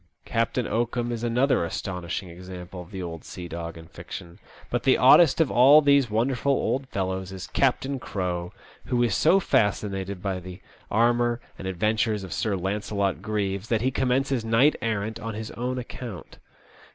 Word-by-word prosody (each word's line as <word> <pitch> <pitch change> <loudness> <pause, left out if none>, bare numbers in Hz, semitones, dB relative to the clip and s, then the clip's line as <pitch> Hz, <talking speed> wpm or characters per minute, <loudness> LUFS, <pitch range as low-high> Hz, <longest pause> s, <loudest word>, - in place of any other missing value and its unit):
Captain 115 +1 0
Oakum 120 +1 -1
is 120 -1 -4
another 125 -1 +2
astonishing 90 +1 -4
ex 90 +2 -11
ample 90 0 -8
of 90 - -12
the 95 -2 -6
old 85 -2 -6
sea 90 -2 -8
dog 85 0 -6
in 80 - -11
fiction; 85 +1 -10 0.3
hut - - 0
the - - +4
oddest 170 -3 +6
of 160 -5 +3
all 135 +5 +8
these 140 -4 +4
wonderful 125 +5 +1
old 135 0 -1
fellows 95 -3 -3
is 95 -1 -6
Captain 135 0 0
Crowe, 90 -5 -3 0.3
who 120 -1 +1
is 115 -4 +1
so 180 +5 +4
fascinated 100 - 0
by 95 0 -2
the 90 +1 -9 0.3
armour 120 +1 +2 0.2
and 95 - -5
adventures 105 +3 0
of 95 - -6
Sir 105 -3 0
Launcelot 100 0 -1
Greaves, 100 -1 -2
that 115 -2 +1
he 130 +2 +1
commences 130 -1 0
knight 115 +7 +4
errant 110 0 -2
on 110 -1 -5
his 110 0 -6
own 125 +2 -3
account. 120 -6 -8
110 Hz, 170 wpm, -25 LUFS, 95-120 Hz, 0.3 s, all